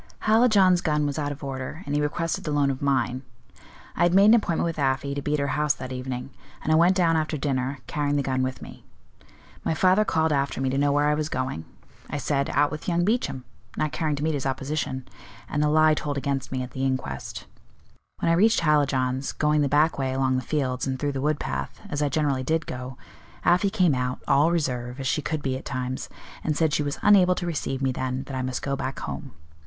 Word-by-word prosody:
"Hallijohn's 215 -5 +5
gun 150 -3 +1
was 145 +1 -2
out 145 -1 -1
of 145 +1 -8
order, 135 +5 -5
and 145 - -3
he 145 - +2
requested 165 +3 -1
the - - -4
loan 145 -2 +2
of 130 - -5
mine. 130 -2 0 0.7
I - - -3
had 175 +1 +4
made 195 +1 +7
an 215 - +7
appointment 200 -9 +2
with 165 -2 -3
Afy 135 0 0
to 140 - -3
be 150 +1 0
at - - -1
her 140 - 0
house 150 -2 +1
that 130 0 -7
evening, 125 0 -5 0.3
and 155 - 0
I - - +5
went 175 +3 +5
down 170 -3 +3
after 155 -1 0
dinner, 135 -1 -1
carrying 145 +2 -1
the 140 - +1
gun 130 -1 0
with 130 0 -3
me. - - -12 0.8
My 160 - 0
father 185 +5 +4
called 160 -5 +1
after 140 -1 -1
me 130 -1 0
to 135 - -1
know 145 0 +3
where 145 +1 +2
I 150 - +3
was 150 0 -1
going; 130 - -3 0.4
I - - -3
said, 140 -1 0
out 145 +1 +2
with 155 0 -7
young 175 -1 +1
Beauchamp, 210 - -1 0.3
not 155 - 0
caring 155 -1 -1
to 145 - -4
meet 160 0 +1
his 140 -2 -2
opposition; 135 -1 -3 0.4
and 145 - -1
the 150 - +3
lie 155 0 +5
told 145 -1 -2
against 140 -1 -2
me 130 -1 -2
at 125 - -8
the 130 - -4
inquest. 130 - -3 0.8
When 165 - +2
I - - +4
reached 215 +5 +4
Hallijohn's, 140 -4 +1
going 150 0 +2
the 140 - +1
back 150 +2 +3
way 130 -1 -1
along 130 -1 +1
the 130 - 0
fields, 130 -2 -1
and 130 -1 -1
through 145 +1 -1
the 135 -1 -3
wood 150 +1 0
path, - - -4
as 145 -1 -1
I 145 - +2
generally 140 -2 0
did 160 +4 0
go, 125 0 -6 0.5
Afy 180 +3 +4
came 185 -7 +3
out, 125 0 -1
all 145 +4 +4
reserve, 125 -6 -2
as 135 - -4
she 150 +3 +1
could 155 0 -3
be 130 -1 -1
at - - -10
times, 130 -1 -4 0.3
and 155 -2 -1
said 160 -2 +2
she - - +2
was 145 -1 -2
unable 185 -3 +6
to 175 - -4
receive 135 -5 -3
me 135 - +2
then, 130 +1 -3
that 135 - -7
I 130 - -1
must 130 0 -3
go 140 -1 -1
back 135 0 -4
home. - - -6
145 Hz, 235 wpm, -25 LUFS, 130-155 Hz, 0.8 s, made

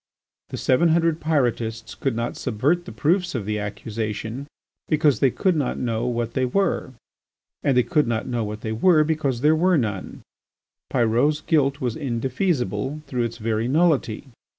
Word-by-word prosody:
The - - -5
seven 150 +6 +3
hundred 165 0 +2
Pyrotists 120 -7 -1
could 135 -4 -2
not 115 +1 -2
subvert 145 +9 0
the - - -8
proofs 175 +1 0
of 110 -5 -2
the 105 0 -2
accusation 110 +4 -4 0.4
because 150 -3 +3
they 135 - +4
could 185 +8 +1
not 145 -5 -1
know 115 -1 -1
what 120 -1 -2
they 130 - 0
were, 150 -1 0 0.7
and 135 -3 +2
they 125 - +5
could 150 -4 +1
not 115 -1 -1
know 120 -3 -2
what 105 0 -5
they 110 - -3
were 155 +8 +4
because 150 -6 -1
there 150 +2 +4
were 180 +2 +3
none. 105 -8 -3 0.7
Pyrot's 125 +5 +2
guilt 145 -3 +1
was 125 -3 -1
indefeasible 130 - -1
through 125 -4 -1
its 115 0 -5
very 115 0 -1
nullity. 145 -6 +1
130 Hz, 165 wpm, -23 LUFS, 115-155 Hz, 0.7 s, they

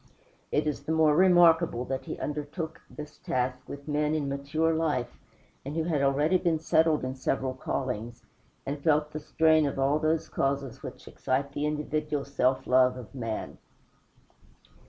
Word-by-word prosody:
It - - +1
is 145 -2 -3
the 160 - -2
more 160 -2 +4
remarkable 170 -7 +5
that 135 0 -4
he - - -5
undertook 150 +2 -5
this 150 0 -10
task 125 0 -1
with 140 +1 -8
men 150 +1 0
in 150 -3 -1
mature 145 +4 0
life, 150 -7 -1 0.5
and 140 +3 -6
who 165 - 0
had 160 -4 0
already 145 +6 +3
been 170 -2 +1
settled 160 0 +2
in 130 - -3
several 130 0 -1
callings, 120 -3 -4 0.4
and 140 +1 -4
felt 150 -1 +2
the 155 - -5
strain 155 0 +3
of 140 - -4
all 140 +3 +2
those 160 +1 0
causes 135 -2 -2
which - - -9
excite 140 +2 -2
the 145 +1 -2
individual 150 -1 -2
self 130 -2 0
love 125 0 +4
of 125 -4 -10
man. 115 -4 -5
145 Hz, 160 wpm, -28 LUFS, 135-155 Hz, 0.5 s, remarkable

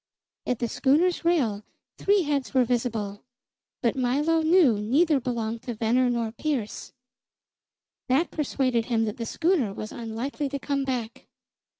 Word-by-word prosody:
At 250 - 0
the 235 - -1
schooner's 305 +10 +2
rail 255 -12 +1 0.4
three 400 -1 +3
heads 280 -7 -2
were 255 -1 +5
visible; 225 -4 -2 0.6
but 235 - +2
Milo 285 +6 +1
knew 315 - +4
neither 285 +8 +3
belonged 230 -2 -3
to 240 -1 -5
Venner 240 +3 +2
nor 235 -2 -1
Pearse. 240 -3 -3 1.2
That 275 +7 +2
persuaded 260 -6 0
him 230 -2 +1
that 210 - -4
the 230 -1 -4
schooner 320 - +1
was 215 - -6
unlikely 240 +5 -4
to 280 - -3
come 275 0 -2
back. 250 -1 -4
250 Hz, 140 wpm, -26 LUFS, 225-290 Hz, 1.2 s, were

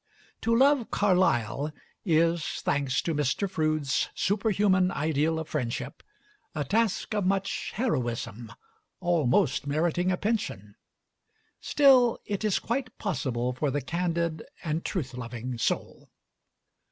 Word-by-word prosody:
To 230 +1 +2
love 270 -2 +4
Carlyle 150 - +1 0.3
is, 165 -1 +3 0.2
thanks 135 -2 0
to 165 - -1
Mr. 150 +6 0
Froude's 155 -5 0
superhuman 195 -2 +2
ideal 155 +1 0
of 160 -1 -4
friendship, 125 -2 -3 0.5
a 150 - 0
task 220 - 0
of 210 -2 0
much 195 0 -1
heroism, 120 - -2 0.5
almost 155 -7 +2
meriting 170 +5 +1
a 180 - 0
pension; 200 - -2 0.9
still 260 -5 +5
it 205 0 -3
is 210 -3 +2
quite 250 +1 -3
possible 125 - -2
for 140 +3 -1
the 145 +2 0
candid 170 +2 -2 0.2
and 160 0 -2
truth 140 -9 -3
loving 120 0 -5
soul. - - -2
165 Hz, 115 wpm, -28 LUFS, 135-200 Hz, 0.9 s, still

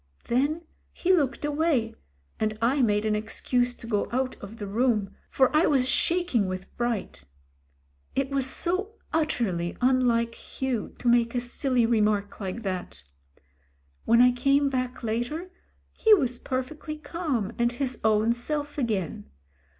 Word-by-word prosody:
Then 285 +7 0 0.3
he 370 +1 +1
looked 290 -4 +1
away, 295 -6 +1 0.5
and 215 0 -1
I 255 +5 +2
made 210 -3 +2
an 215 -1 +2
excuse 245 +3 0
to - - -10
go 210 -3 -1
out 255 +1 -1
of 205 +3 -9
the 210 - -5
room, 215 -1 +1 0.2
for 265 +2 +2
I 315 +3 +5
was 265 -4 +3
shaking 335 - +2
with 185 0 -5
fright. 230 - -3 0.9
It 275 0 0
was 270 -2 +1
so 370 +9 0 0.2
utterly 220 - 0
unlike 245 -2 +2
Hugh 255 -4 -4
to 245 - -4
make 235 0 +3
a - - +2
silly 245 0 0
remark 210 -3 +1
like 200 +3 -4
that. 180 - -4 1.0
When 235 +1 +5
I 250 - +6
came 275 +3 +2
back 255 -1 -3
later, 245 +11 -2 0.4
he 440 -1 +5
was 255 -9 -1
perfectly 295 +4 -4
calm 295 - -2
and 235 0 +2
his 255 0 -2
own 220 +1 +3
self 290 +4 -3
again. 200 - -2
245 Hz, 145 wpm, -27 LUFS, 220-280 Hz, 1.0 s, I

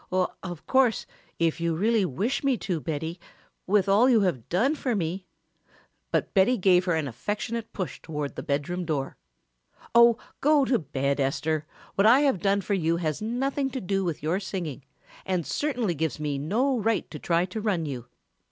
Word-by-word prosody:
"Of 180 -2 -3
course 260 -5 +3 0.3
if 165 0 0
you 170 -1 0
really 215 +3 +2
wish 200 - -1
me 270 -3 +2
to, 180 -5 -2
Betty, 160 +3 -4 0.5
with 200 0 +3
all 210 +6 +5
you 230 -4 +5
have 160 - -1
done 230 - +2
for 260 -6 -1
me 180 0 -3 0.4
" - - -34
But - - 0
Betty 220 +6 +4
gave 180 -1 +4
her 175 -3 +1
an 155 -3 -1
affectionate 210 - -4
push 180 -9 -5
toward 150 -3 -4
the - - -4
bedroom 155 +6 -2
door. 150 -5 -2 0.8
"Oh, 235 0 +7 0.2
go 295 -1 +4
to 250 -2 +2
bed, 140 -1 -1
Esther, 150 +3 -1 0.3
what 200 +2 +4
I 250 +5 +7
have 275 -10 +2
done 200 +1 +2
for 200 - -2
you 170 -3 +1
has 155 -1 -2
nothing 270 +5 -1
to 265 - -4
do 195 -2 -1
with 170 -5 -3
your 165 +5 +1
singing 175 -8 -5 0.4
and 180 -4 -1
certainly 250 - -1
gives 160 -1 -2
me 145 -2 -2
no 240 - +1
right 225 +1 0
to 150 - -7
try 170 +3 +1
to 190 +4 -5
run 195 -7 0
you. 125 -5 -5
185 Hz, 185 wpm, -26 LUFS, 160-225 Hz, 0.8 s, Oh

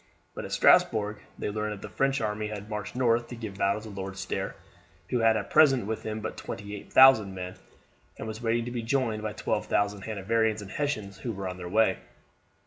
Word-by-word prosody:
But - - -6
at - - -8
Strasbourg 105 -1 +4 0.2
they - - -3
learned 105 0 -2
that 100 - -9
the 105 -3 -8
French 135 -2 +1
army 105 0 -2
had 105 0 -7
marched 105 +1 -4
north 120 -2 +2
to 120 - -7
give 110 -4 -7
battle 100 +2 +1
to 110 - -9
Lord 95 -1 -6
Stair, 95 -1 -3 0.6
who 125 - +2
had 115 -1 +4
at 100 -2 -5
present 135 -7 +5
with 110 +1 -3
him 110 0 -4
but 110 - -5
twenty 105 0 -6
eight 100 - -11
thousand 110 -8 +7
men, 90 0 -5 0.6
and - - -6
was 110 +1 -6
waiting 115 0 +1
to 120 - -5
be 120 -1 -3
joined 115 -2 0
by 105 -1 -3
twelve - - -2
thousand 100 0 +1
Hanoverians 110 +1 0
and 95 - -10
Hessians 110 -10 -3
who 120 - -3
were 100 -2 -4
on 90 0 -5
their 90 -1 -6
way. 105 -1 +3
110 Hz, 220 wpm, -28 LUFS, 100-115 Hz, 0.6 s, thousand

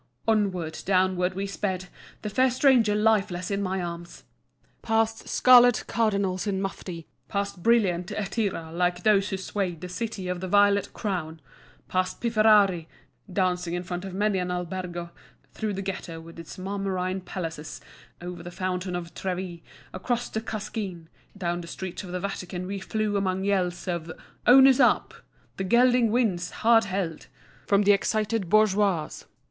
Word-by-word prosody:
Onward, 190 -7 0
downward, 185 -1 +1
we 195 +1 -2
sped, 190 -1 -3 0.4
the 210 - -2
fair 260 +4 +3
stranger 250 -5 +4
lifeless 210 -4 +1
in 200 0 0
my 190 -1 -1
arms. 170 0 -7 0.6
Past 225 0 0
scarlet 245 -2 +6
cardinals 200 -4 0
in 195 -2 0
mufti, 180 -4 -5 0.2
past 200 -2 -3
brilliant 185 -6 +2
έτᾶιραὶ 195 -6 -3
like 175 0 0
those 205 -2 +3
who 195 - -2
swayed 190 -3 -3
the 180 - -6
City 195 0 -4
of 180 0 -2
the 185 - -4
Violet 200 +1 +3
Crown; 170 -6 -3 0.5
past 185 0 -1
pifferari 215 -7 +4 0.4
dancing 180 -2 0
in 175 - -3
front 175 0 -5
of 190 -1 -6
many 205 -1 +1
an 180 0 -2
albergo; 180 -1 -4 0.4
through 215 -2 -3
the 195 - -4
Ghetto 185 -3 -5
with 165 +1 -12
its 165 - -9
marmorine 190 -1 -2
palaces, 165 -5 -6 0.4
over 175 0 -6
the 175 - -8
Fountain 180 0 -3
of 170 -1 -6
Trevi, 180 -2 -4 0.3
across 245 -1 -2
the 220 - -3
Cascine, 205 -6 -5 0.3
down 175 -2 -2
the 170 - -10
streets 185 +2 -6
of 180 - -8
the 180 - -2
Vatican 185 -1 -4
we 195 +1 -4
flew 210 +1 -1
among 190 -1 -1
yells 185 -3 0
of 170 -2 -3 0.4
"Owner's 265 +1 +8
up," - - +3 0.4
"The 195 - -2
gelding 240 +3 +4
wins, 210 -7 +1 0.2
hard 225 -1 +6
held," 185 -8 -3 0.4
from 200 +1 +4
the 205 - +5
excited 210 -1 0
bourgeoisie. 200 -6 +2
190 Hz, 155 wpm, -26 LUFS, 180-210 Hz, 0.6 s, Owner's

